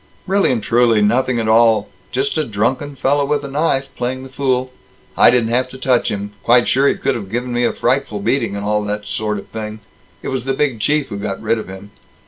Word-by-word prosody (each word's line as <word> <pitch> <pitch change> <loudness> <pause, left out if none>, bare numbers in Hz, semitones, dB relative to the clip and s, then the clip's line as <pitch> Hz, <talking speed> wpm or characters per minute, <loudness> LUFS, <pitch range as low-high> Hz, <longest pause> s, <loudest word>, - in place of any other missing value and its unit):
"Really 195 -3 +2
and 115 -4 -1
truly. 115 -1 +3
Nothing 125 +4 +2
at 110 - -1
all. 110 -1 +4 0.2
Just 135 +2 -1
a 155 - +1
drunken 130 +5 -2
fellow 140 +2 +1
with 145 0 0
a - - -5
knife, 140 -1 0
playing 130 +1 -3
the 135 - -10
fool. 130 -1 -1 0.4
I - - +7
didn't 120 -2 +2
have 125 +2 +1
to 130 - -10
touch 130 -2 +1
him 100 0 -4
quite 120 0 +4
sure 135 +2 +3
he - - +2
could - - -1
have 100 -5 -6
given 120 +3 -3
me 120 0 +1
a - - +2
frightful 130 -6 -1
beating 115 0 0
and 100 0 -4
all 105 0 +1
that 105 0 -3
sort 105 -1 -2
of 100 - -8
thing. 110 -1 -6 0.4
It - - -3
was 130 -2 -3
the 135 - 0
Big 135 -5 0
Chief 150 +6 +1
who 100 - -5
got 100 -1 -4
rid 115 - 0
of - - -7
him." 95 +2 -10
120 Hz, 235 wpm, -18 LUFS, 105-135 Hz, 0.4 s, I